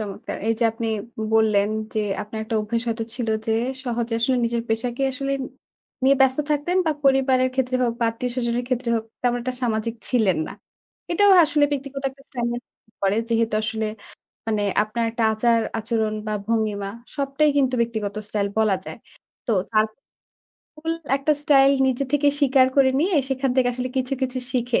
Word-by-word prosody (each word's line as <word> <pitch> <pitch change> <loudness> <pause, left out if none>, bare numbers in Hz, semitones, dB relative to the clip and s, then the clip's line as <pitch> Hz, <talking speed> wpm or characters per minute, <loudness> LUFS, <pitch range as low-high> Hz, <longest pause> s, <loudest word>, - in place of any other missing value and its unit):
চমৎকার 205 -2 -5
এই 225 - +3
যে 235 - +2
আপনি 225 0 -4 0.5
বললেন 210 -2 +3 0.3
যে, - - 0 0.2
আপনার 215 +1 -7
একটা 220 0 -2
অভ্যেস 230 +2 -2
হয়তো 225 0 -2
ছিল 240 -3 -3 0.2
যে 225 - +1 0.3
সহজে 235 -1 -2
আসলে 255 +2 +2
নিজের 235 0 -1
পেশাকে 240 +3 -1
আসলে 275 0 -2 0.7
নিয়ে 275 +1 +5
ব্যস্ত 265 0 +4
থাকতেন 300 +5 0
বা 315 - +3
পরিবারের 265 -1 +4
ক্ষেত্রে 255 -1 0
হোক 235 -1 +1
বা 235 - +3
আত্মীয় 245 +2 -4
স্বজনের 240 -1 -1
ক্ষেত্রে 250 -1 -1
হোক 220 -1 -1 0.2
তেমন 245 -1 +2
একটা 255 0 -3
সামাজিক 230 -1 -1
ছিলেন 215 -9 +2
না। - - -7 0.6
এটাও 405 +3 +5
আসলে 295 -1 +2
ব্যক্তিগত 275 0 -4
একটা 275 +1 -20
স্টাইলের 240 -1 -2
মধ্যে 220 - -36
পড়ে 195 +2 +2
যেহেতু 230 -1 +1
আসলে 220 0 -2 0.6
মানে 215 -2 0 0.2
আপনার 230 +2 -3
একটা 230 -1 -1
আচার-আচরণ 225 -1 0
বা 215 - -1
ভঙ্গিমা 215 -3 0 0.3
সবটাই 280 +1 +1
কিন্তু 260 -2 +2
ব্যক্তিগত 220 -3 -2
স্টাইল 205 -1 -1
বলা 215 -3 +3
যায়। - - -7 0.5
তো - - +1 0.3
আ - - +8 1.0
full 325 0 -1 0.2
একটা 280 +2 +1
স্টাইল 275 -2 +5 0.2
নিজে 260 +1 0
থেকে 290 0 +4
স্বীকার 265 -2 +5
করে 270 -1 +5
নিয়ে 360 +3 +1 0.2
সেখান 265 0 0
থেকে 250 -1 +4
আসলে 255 +1 -3
কিছু, 260 +1 -1
কিছু 260 0 -1
শিখে 245 -1 +1
240 Hz, 170 wpm, -23 LUFS, 225-270 Hz, 1.0 s, আ